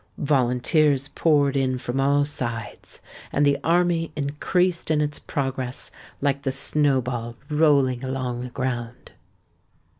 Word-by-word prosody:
Volunteers 140 +1 +2
poured 145 -4 +2
in 130 -1 +1
from 125 +1 -3
all 140 +1 +3
sides; 120 -6 -5 0.3
and 145 - +2
the 140 -1 +2
army 170 -1 +2
increased 165 +5 0
in 155 -1 +2
its 150 -1 -1
progress, 130 -2 -3 0.3
like 140 -1 0
the 135 -2 -1
snowball 130 -4 0 0.2
rolling 140 -5 +3
along 130 -2 -3
the 125 - -6
ground. 125 -2 -4
140 Hz, 120 wpm, -24 LUFS, 125-150 Hz, 0.3 s, all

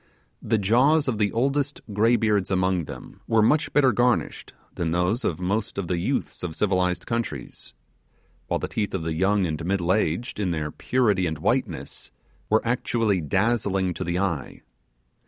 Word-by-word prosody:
The 110 - +1
jaws 130 +10 +3
of 115 -5 -1
the 105 -1 +2
oldest 140 +4 0
graybeards 105 -2 +2
among 95 -2 +1
them - - -10
were 110 -1 +3
much 150 +7 +2
better 135 -3 +4
garnished 120 +2 0 0.2
than 85 -2 -2
those 90 +9 0
of 80 - -1
most 100 +4 -2
of 100 -3 -2
the 90 -1 -1
youths - - -2
of 85 -3 -4
civilized 90 -2 0
countries; 75 - -4 0.7
while - - 0
the - - -4
teeth 105 -3 -2
of 90 - -3
the 80 0 -2
young 95 +4 +2
and 80 -1 -3
middle 90 0 +1
aged, 105 +2 -1
in 100 -3 0
their 75 -3 -2
purity 105 -8 +1
and 80 -1 -3
whiteness, 100 - -2 0.4
were 110 +2 +2
actually 115 -5 +1
dazzling 95 +1 0
to - - -4
the 85 +1 -2
eye. 90 -7 -3
100 Hz, 165 wpm, -25 LUFS, 90-115 Hz, 0.7 s, better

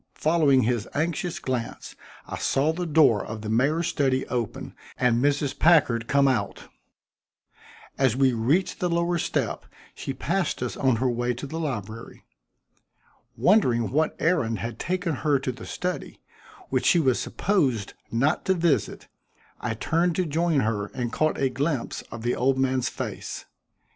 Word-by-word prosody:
Following 150 -5 +3
his 120 -1 0
anxious 165 +3 -1
glance, 125 -3 -4 0.3
I - - -6
saw 145 +4 +1
the 175 +1 -3
door 145 -8 +4
of 110 0 -7
the 105 - -5
mayor's 140 +9 +2
study 135 -4 +1
open 120 -4 -3 0.2
and 125 -1 +2
Mrs. 145 -1 0
Packard 130 -9 +4
come 140 -1 +3
out. 110 -7 -2 1.3
As 130 -4 +3
we 135 -1 +3
reached 135 +12 +1
the 180 - 0
lower 170 +1 +1
step, - - -2 0.3
she - - -5
passed 170 +3 -1
us 125 - -3
on 130 -3 +2
her 125 +4 0
way 120 0 -1
to 125 - -6
the 160 +4 -5
library. 115 -7 -5 1.1
Wondering 125 - +3
what 155 +4 +1
errand 130 -10 +1
had 115 -1 -5
taken 180 -4 -1
her 145 -1 +2
to 130 -1 -3
the 125 - -10
study, 180 0 -4 0.5
which - - 0
she 175 - +5
was 130 -6 +2
supposed 135 - 0 0.2
not 135 +8 +1
to 190 - +2
visit, 165 - 0 0.5
I 115 -2 -3
turned 165 +8 0
to 185 - 0
join 160 -1 +1
her 105 -3 -1
and 120 -2 -3
caught 155 0 +1
a 135 - +2
glimpse 140 0 -2
of 115 -1 -7
the 120 +1 +1
old 130 +1 +1
man's 130 -1 +1
face. - - -6
135 Hz, 160 wpm, -25 LUFS, 120-160 Hz, 1.3 s, she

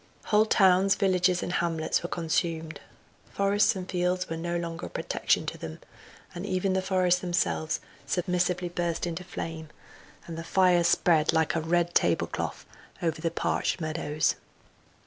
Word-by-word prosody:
Whole 215 +1 +3
towns, 195 -2 +4
villages 185 -2 +2
and 180 - -3
hamlets 165 -2 0
were 175 - -5
consumed; 165 -1 -2 0.5
forests 200 +1 +2
and 185 -1 -5
fields 180 0 0
were 165 - -4
no 170 +1 -2
longer 170 0 -5
a - - -10
protection - - 0
to - - -5
them, 80 -1 -7 0.5
but 175 - -6
even 190 -1 0
the 190 - +1
forests 185 -1 +2
themselves 170 -3 0 0.3
submissively 180 0 0
burst 170 -1 -2
into 170 +1 -4
flame, 165 -3 -6 0.6
and 165 -1 -7
the - - -5
fire 180 0 +3
spread 165 -2 +3
like 160 -1 +2
a 165 - 0
red 175 +2 +1
table 85 -1 +3
cloth - - -5 0.4
over 160 -2 -1
the 165 - +1
parched 170 - -1
meadows. 155 -2 0
175 Hz, 155 wpm, -28 LUFS, 165-185 Hz, 0.6 s, towns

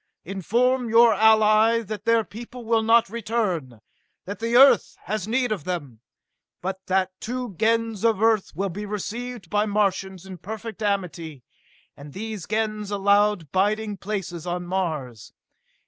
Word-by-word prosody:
Inform 235 +7 0
your 230 +1 +6
ally 220 +2 +4
that 210 -1 -7
their 230 -1 +3
people 235 +4 -10
will 225 0 +2
not 230 +1 +4
return, 195 - -3 0.4
that 200 +1 -6
the 230 +1 +1
Earth 265 -5 +5
has 215 -1 -3
need 245 +1 0
of 195 -8 -2
them 145 -11 -5 0.6
but 190 +1 -5
that 185 0 +1
two 245 -2 -4
Gens 225 +2 0
of 225 -4 +2
Earth 220 -2 +2
will 195 +3 -1
be 205 +4 -6
received 215 -1 -6
by 210 +1 +1
Martians 190 -3 -1
in 190 -2 -9
perfect 220 +4 -7
amity, 170 - -3 0.5
and 140 0 -12
these 215 -3 -6
Gens 215 -1 -2
allowed 200 -4 +2
biding 210 +2 0
places 185 -4 -5
on 175 0 -3
Mars! 155 - -4
210 Hz, 145 wpm, -24 LUFS, 185-225 Hz, 0.6 s, your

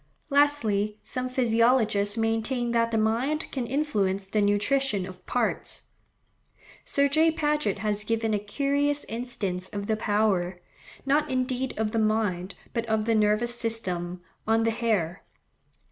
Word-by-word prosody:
Lastly, 220 -8 +2
some 255 0 -3
physiologists 230 -4 +2
maintain 225 +2 0
that 230 -1 +2
the 225 - 0
mind 235 +8 0
can 255 -4 -3
influence 210 -9 0
the 210 +2 0
nutrition 205 +1 +1
of 185 -1 -11
parts. 245 -3 -2 1.0
Sir 280 0 +2
J. 315 +3 +4
Paget 300 -5 0
has 210 0 -1
given 225 0 0
a 210 - +1
curious 280 +7 0
instance 205 -6 -4
of 200 -1 -5
the 220 - +1
power, 205 -4 0 0.5
not 295 +2 +2
indeed 255 0 -1
of 215 -1 0
the 225 - 0
mind, 210 -4 0 0.2
but 230 -1 -2
of 220 -1 0
the 230 - +2
nervous 215 +2 +2
system, 185 -7 -2 0.3
on 225 0 +3
the 225 - +2
hair. 210 -7 -1
225 Hz, 140 wpm, -27 LUFS, 205-255 Hz, 1.0 s, J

